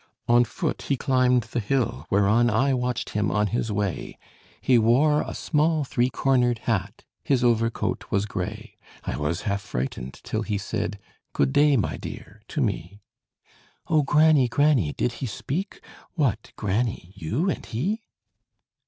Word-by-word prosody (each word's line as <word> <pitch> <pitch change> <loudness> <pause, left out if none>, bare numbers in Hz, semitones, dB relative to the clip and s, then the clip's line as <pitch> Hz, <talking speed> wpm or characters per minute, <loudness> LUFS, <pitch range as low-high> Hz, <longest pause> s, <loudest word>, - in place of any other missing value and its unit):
On 120 +1 +6
foot 160 +7 -3
he 140 - +2
climbed 125 -2 +2
the 115 +2 -3
hill, 105 - -1
whereon 105 +4 +3
I 135 +3 +2
watched 125 -1 -2
him 105 -1 0
on 105 0 +1
his 110 +1 -1
way: 100 -3 -3 0.4
He 125 -2 +4
wore 140 +7 +4
a - - -5
small 155 0 +1
three 125 -2 +1
cornered 125 -1 +2
hat; 105 -2 -2 0.2
His 130 -3 +1
overcoat 115 -1 +1
was 100 +1 +1
gray. 95 -3 -6 0.2
I - - -3
was 75 +4 -2
half 100 -1 -1
frightened 65 -3 -5
till 110 - -2
he 105 -2 -2
said 100 0 -3 0.4
'Good 135 - +1
day, 145 -1 +5
my 105 - -1
dear!' 105 +3 -9
to 150 - -2
me." 100 - -2 0.9
"O 155 -2 +4
granny, 150 -1 +4
granny, 135 - +2
did 120 - -1
he 130 - -1
speak? 170 - -4 0.3
What, 125 - 0
granny! 105 -3 -2
you 105 - -1
and - - -5
he?" 190 - -2
120 Hz, 155 wpm, -25 LUFS, 100-135 Hz, 0.9 s, On